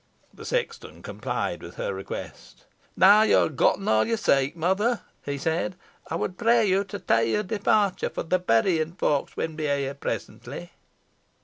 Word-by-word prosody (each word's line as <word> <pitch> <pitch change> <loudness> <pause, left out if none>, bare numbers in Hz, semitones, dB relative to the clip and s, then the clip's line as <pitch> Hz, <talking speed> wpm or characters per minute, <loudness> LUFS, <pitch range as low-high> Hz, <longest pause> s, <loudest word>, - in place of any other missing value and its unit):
The - - -11
sexton 475 -2 -3
complied - - -3
with - - -10
her - - -3
request. - - -8 0.3
"Now 205 +3 +7
yo 220 - +4
ha' 155 - -10
getten 195 +8 +2
aw 110 0 +4
yo 230 - +1
seek, 140 -9 +1
mother," 190 +8 +1 0.2
he 140 0 -3
said, 165 +5 -1 0.4
"ey - - 0
wad 180 - -3
pray 235 -1 +4
you 195 0 +2
to 205 +1 -6
tay 115 - +1
your 210 - +1
departure, 205 -1 +1
fo' - - -4
the 185 +3 +1
berrin 160 +3 +1
folk 145 -6 0
win 160 -1 -3
be 155 -1 -3
here 140 -1 -1
presently." 85 -9 -6
180 Hz, 170 wpm, -25 LUFS, 145-210 Hz, 0.4 s, Now